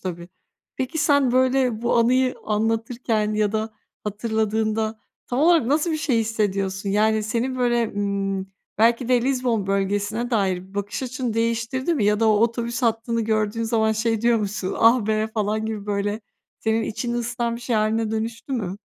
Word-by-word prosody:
tabii. 175 -2 -6 0.5
Peki 260 +4 -3
sen, 285 -5 +3
böyle, 255 -3 +2
bu 235 - +2
anıyı 255 +2 +3
anlatırken 225 0 0
ya 210 -1 +1
da 220 0 -1 0.3
hatırladığında 220 +1 -1 0.3
tam 245 - -2
olarak 325 -3 +4
nasıl 300 +5 +1
bir - - 0
şey 300 -7 +1
hissediyorsun? 200 -3 -1
Yani 215 +2 +2
senin, 240 +4 -2
böyle, 240 -2 +1
ımm, 195 -1 -2 0.3
belki 230 +2 +3
de 250 -2 +3
Lizbon 250 -5 0
bölgesine 205 +4 -1
dair 190 -4 -1
bakış 205 +5 -3
açını 255 -2 -3
değiştirdi 230 +6 0
mi 230 - 0
ya 210 +1 +2
da 225 - +4
o - - +5
otobüs 235 +2 0
hattını 230 0 0
gördüğün 215 0 0
zaman 220 -1 +1
şey 225 0 0
diyor 235 0 +3
musun, 205 -2 -3
"Ah, 230 -1 +5
be!" 215 0 +1
falan 215 0 -1
gibi 215 -2 -5
böyle 205 +1 -1 0.4
senin 220 0 +1
içini 235 +2 -3
ısıtan 235 0 -2
bir - - -10
şey 240 -1 -1
hâline 215 +1 +1
dönüştü 225 +4 -4
mü? 200 -7 -2
225 Hz, 165 wpm, -23 LUFS, 210-240 Hz, 0.5 s, o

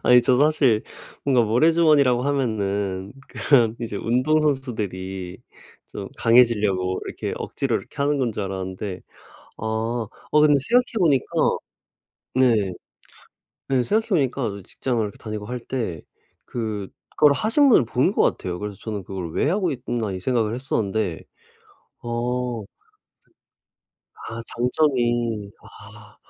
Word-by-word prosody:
아니 125 0 +7
저도 130 +3 +4
사실 130 -8 +2 0.4
뭔가 130 -4 +4
모래 120 +9 +4
주머니라고 145 -7 +4
하면은 100 -8 -1 0.2
그런 115 -6 +3
이제 110 -3 -4
운동선수들이 115 -9 -1 0.5
좀 - - -7
강해지려고 105 -6 +3
이렇게 - - -4
억지로 - - -1
이렇게 - - -10
하는 145 +1 +1
건 125 -5 0
줄 105 - -3
알았는데 95 0 -5 0.6
아. 110 - -5 0.7
아 150 - +5
근데 150 -1 +6
생각해 245 -1 +2
보니까 145 -8 +3 1.1
네. 115 -7 +3 1.0
네 130 -2 +2
생각해 220 - +1
보니까 130 - 0
직장을 120 -4 -2
이렇게 105 -1 -6
다니고 105 -1 -6
할 125 +1 -4
때 110 - -3 0.4
그거를 115 +6 0
하신 270 +6 +3
분을 130 - +5
본 130 - +1
것 - - +2
같아요. 90 -1 -1
그래서 105 -2 -5
저는 105 -3 -4
'그걸 90 -3 -6
왜 145 - +1
하고 190 0 +1
있나.' 120 -5 -3
이 95 - -4
생각을 115 -1 0
했었는데 110 -8 -2 0.8
어 120 -2 -2 1.6
아 115 0 -5 0.2
장점이 120 -5 +1
아. - - -15
120 Hz, 270 characters per minute, -23 LUFS, 100-135 Hz, 1.6 s, 아니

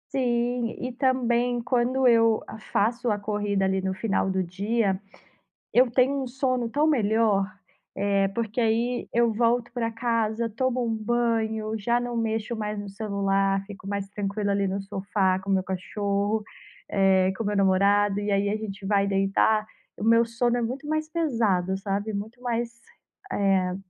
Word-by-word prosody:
Sim. 240 -2 0
E 255 0 -3
também, 245 -2 +1
quando 250 +2 +1
eu 230 -2 +4
a 220 - -9
faço 235 +3 0
a 210 - +1
corrida 205 -1 -1
ali, 190 0 +1
no 190 0 -2
final 195 -2 0
do 190 0 0
dia, 195 +2 -1 0.7
eu 250 0 +5
tenho 265 +3 +2
um - - -6
sono 255 -2 -1
tão 295 +6 +2
melhor, 220 -6 +2 0.5
eh, 200 0 +1
porque 230 +1 -2
aí 235 +2 0
eu 235 -1 +3
volto 235 +2 +1
pra 230 -2 -2
casa, 230 -1 -1
tomo 255 +2 -1
um 225 - -1
banho, 220 -1 0
já 235 +4 +1
não 245 -1 -4
mexo 225 +1 -1
mais 210 -1 -3
no 205 - -7
celular, 195 -1 0
fico 200 -1 -11
mais 200 -1 -3
tranquila 200 0 -2
ali, 200 0 +1
no 195 +1 -2
sofá 195 -1 0
com 195 +1 -6
meu 190 -1 +3
cachorro, 200 +3 -1 0.5
eh, 190 -1 +3
com 225 - -3
o - - -2
meu 205 - 0
namorado. 200 +1 +3
E 205 0 -1
aí 200 +1 +2
a 215 - 0
gente 200 -2 -7
vai 200 0 +2
deitar. 195 +2 +2 0.3
O - - -9
meu 230 +1 +5
sono 240 +1 0
é 240 - 0
muito 255 +5 -4
mais 310 0 -1
pesado, 225 - 0
sabe, 200 +2 -2
muito 220 +5 -6
mais, 235 -1 -3 0.5
eh 190 -2 +1
220 Hz, 170 wpm, -26 LUFS, 200-240 Hz, 0.7 s, eu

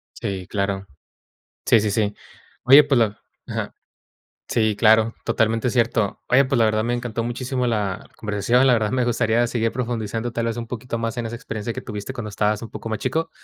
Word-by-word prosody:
Sí, 95 -2 -4
claro. 100 -1 -2 0.8
Sí, 115 - +6
sí, 105 0 0
sí. 105 0 0 0.5
Oye, 140 +4 +9
pues 140 -3 +2
la 110 -3 0 0.3
Ajá. - - -4 0.7
Sí 110 -2 +1
claro, 110 0 +4
totalmente 115 +2 +1
cierto. 115 -4 0
Oye, 135 +2 +5
pues, 130 -1 0
la 115 - +5
verdad, 110 0 +1
me 120 +1 0
encantó 120 -2 -3
muchísimo 125 +2 -2
la 105 -5 -2
conversación. 110 +4 +2
La 130 - +6
verdad 110 -3 +1
me 130 -1 +1
gustaría 120 0 +2
seguir 115 -1 0
profundizando, 115 -1 -3
tal 115 0 -2
vez, 115 0 -2
un 115 -1 -5
poquito 120 0 -4
más 115 0 -3
en 120 - -2
esa 115 +1 -4
experiencia 110 -1 -5
que 130 - -6
tuviste, 105 +2 -6
cuando 120 -5 -5
estabas 105 0 0
un 115 - -7
poco - - -7
más 110 - -2
chico, 160 +6 -1
115 Hz, 195 wpm, -22 LUFS, 110-120 Hz, 0.8 s, Oye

